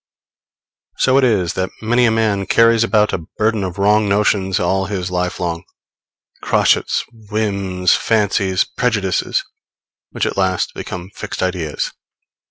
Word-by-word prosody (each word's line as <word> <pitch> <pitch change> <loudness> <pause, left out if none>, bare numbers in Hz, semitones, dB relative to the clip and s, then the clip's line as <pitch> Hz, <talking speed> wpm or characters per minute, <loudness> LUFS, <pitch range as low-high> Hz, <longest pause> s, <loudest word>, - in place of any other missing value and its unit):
So 130 +1 +3
it - - +1
is 100 -9 +2
that 95 0 -2
many 120 +3 +2
a - - +4
man 110 -3 0
carries 115 0 +4
about 105 -2 +2
a 80 -3 -4
burden 110 -1 +1
of 90 -1 -5
wrong 105 +1 +3
notions 100 -1 +1
all 95 +2 0
his 90 -2 -3
life 90 0 -2
long 85 -1 -3 0.8
crotchets, - - +2 0.2
whims, 100 -4 0
fancies, 100 -4 +1
prejudices, 105 -6 -1 0.7
which - - -2
at - - -3
last 95 -2 0
become 90 +2 -7
fixed 105 -3 -5
ideas. 90 -5 -2
100 Hz, 135 wpm, -18 LUFS, 90-110 Hz, 0.8 s, a